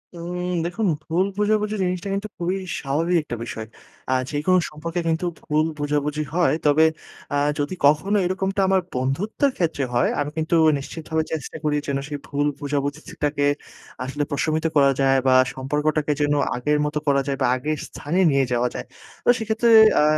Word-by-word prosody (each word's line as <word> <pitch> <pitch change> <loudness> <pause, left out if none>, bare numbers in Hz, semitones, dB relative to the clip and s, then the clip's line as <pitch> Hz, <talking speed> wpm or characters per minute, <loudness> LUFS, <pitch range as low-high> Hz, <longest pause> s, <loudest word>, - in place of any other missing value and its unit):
উম 180 +1 -4 0.2
দেখুন, 190 +4 -1 0.2
ভুল 170 +4 +1
বোঝাবুঝি 210 0 +1
জিনিসটা 180 +2 -2
কিন্তু 200 +2 -2
খুবই 180 +2 -1 0.2
স্বাভাবিক 160 +6 0
একটা 120 - -5
বিষয়। 110 -2 -6 0.4
আ - - +4 0.2
যেকোনো 155 +5 +2
সম্পর্কে 165 +3 -4
কিন্তু 165 +2 0 0.2
ভুল 155 +1 +1
বোঝাবুঝি 145 +1 -1
হয়। 175 -1 +3
তবে 150 +2 +5 0.5
আ - - +1 0.2
যদি 145 +5 -1
কখনো 155 +9 +3
এরকমটা 190 +2 -1
আমার 190 0 +3
বন্ধুত্বের 175 - 0
ক্ষেত্রে 165 -5 0
হয়, 120 +1 +3
আমি 145 0 -1
কিন্তু 160 +2 +1 0.2
নিশ্চিতভাবে 160 +3 -3
চেষ্টা 155 -5 -4
করি, 150 -1 +1
যেন 140 - 0
সেই 145 0 -4
ভুল 145 +1 0
বোঝাবুঝিটাকে 145 0 -2 0.6
আসলে 135 +3 -2
প্রশমিত 155 +3 0
করা 140 -2 +5
যায় 135 0 +4
বা 130 - +5 0.2
সম্পর্কটাকে 150 +3 -1
যেন 145 0 +2 0.2
আগের 150 +5 +1
মতো 150 0 -1
করা 140 -1 +3
যায় 140 -1 -1
বা 130 - +3
আগের 150 +4 -2
স্থানে 165 +6 -3
নিয়ে 135 -1 +3
যাওয়া 120 0 +2
যায়। - - -5 0.4
তো - - +3
সেক্ষেত্রে, 220 +1 +1 0.3
আ - - +4
150 Hz, 165 wpm, -23 LUFS, 145-180 Hz, 0.6 s, তবে